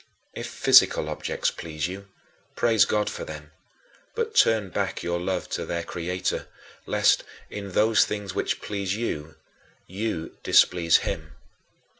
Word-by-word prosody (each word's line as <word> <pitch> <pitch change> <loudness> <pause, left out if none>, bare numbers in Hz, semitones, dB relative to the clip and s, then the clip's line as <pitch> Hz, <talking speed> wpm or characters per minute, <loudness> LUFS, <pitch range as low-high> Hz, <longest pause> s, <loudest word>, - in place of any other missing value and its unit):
If - - -5
physical 75 - +5
objects 75 - -2
please 75 -2 -4
you, 100 +2 -8 0.5
praise 115 -5 +4
God 105 -1 0
for - - -4
them, 75 0 -9 0.6
but 455 -1 -2
turn 110 -4 +4
back - - -2
your 85 0 -1
love 90 0 -2
to - - -3
their 85 0 -3
Creator, 90 +2 -3 0.4
lest, - - +3 0.3
in 100 -2 -6
those 110 +2 +4
things 105 -3 -4
which - - -2
please 100 -2 -2
you, 80 -9 -4 0.5
you 95 -4 -4
displease 85 -2 +5
him. 80 0 -4
90 Hz, 135 wpm, -25 LUFS, 85-105 Hz, 0.6 s, physical